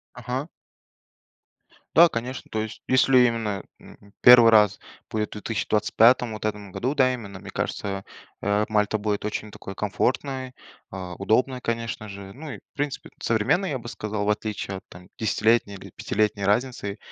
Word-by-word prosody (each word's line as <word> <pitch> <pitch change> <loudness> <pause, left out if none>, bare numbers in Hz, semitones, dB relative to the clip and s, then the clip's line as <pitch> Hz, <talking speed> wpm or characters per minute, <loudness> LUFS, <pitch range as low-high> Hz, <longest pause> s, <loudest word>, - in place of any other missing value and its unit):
Ага. 125 +4 -4 1.5
Да, 170 +1 +8
конечно, 125 +2 -5
то 110 - -1
есть 110 - -8
если 130 0 +5
именно, 115 -5 +1 0.2
м, 100 0 -17
1 120 -2 +9
раз 105 -3 +5 0.3
будет 105 -1 -1
в - - -39
2025-ом, 110 +2 +2
вот 110 - -7
в - - +1
этом 105 -2 -5
году, 130 +9 -2
да, 130 -2 +4
именно, 100 -6 -7
мне - - -10
кажется, 100 -1 -3 0.4
э, 105 +1 +1
Мальта 105 0 +1
будет 105 -1 -2
очень 105 0 -4
такой 95 -1 -9
комфортной, 130 +5 -1 0.4
а, 90 -2 -6
удобной, 125 +6 +1
конечно 115 -2 -3
же, 100 0 -9
ну, 155 +2 -9
и - - -6
в - - -49
принципе, 145 -1 -4
современной, 115 - +1
я 135 - -1
бы 120 -1 -10
сказал, 105 -2 -3
в 105 - 0
отличие 105 -2 -3
от, - - -12
там, 90 0 -13
десятилетней 110 -1 +2
или 95 - -11
пятилетней 105 -2 0
разницы, 120 0 0
110 Hz, 165 wpm, -25 LUFS, 105-125 Hz, 1.5 s, 1